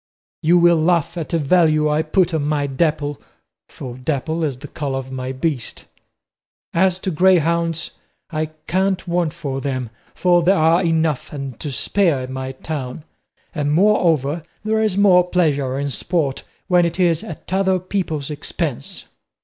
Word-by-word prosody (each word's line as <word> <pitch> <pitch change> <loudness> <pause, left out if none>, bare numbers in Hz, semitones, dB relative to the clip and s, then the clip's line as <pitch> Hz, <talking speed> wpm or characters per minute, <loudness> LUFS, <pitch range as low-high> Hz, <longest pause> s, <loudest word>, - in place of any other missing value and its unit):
You 170 +3 +4
will 170 -2 +5
laugh 170 0 +1
at 165 -3 -4
the 170 - +1
value 155 0 +3
I 150 +1 +2
put 170 +2 +1
on 155 -2 0
my 145 -1 0
Dapple 145 +1 -1 0.5
for 125 -2 -8
dapple 155 +4 -2
is 140 -5 -1
the 145 +3 -9
colour 140 -2 -3
of 130 0 -6
my 130 0 -4
beast. 130 -2 -3 0.9
As 185 +1 +3
to 190 - -2
greyhounds, 170 -1 +2 0.4
I 155 -1 -1 0.2
can't 190 +1 0
want 170 -2 0
for 140 -5 -4
them, 130 -4 -3 0.2
for 175 -1 +3
there 185 +4 +3
are 165 +3 +4
enough 160 -4 0
and 135 -5 -6
to 150 - -4
spare 165 0 +1
in 130 +1 -6
my 130 0 -4
town; 135 0 -6 0.5
and, 145 -2 0
moreover, 165 -5 +2 0.2
there 220 0 +1
is 210 -3 0
more 180 -3 +5
pleasure 145 -7 +1
in 140 0 -2
sport 155 -3 -1 0.2
when 180 -2 +4
it 170 +2 -2
is 170 -3 +2
at 170 +2 -8
other 190 -1 +2
people's 170 -6 -3
expense." 140 - -4
160 Hz, 160 wpm, -20 LUFS, 140-175 Hz, 0.9 s, will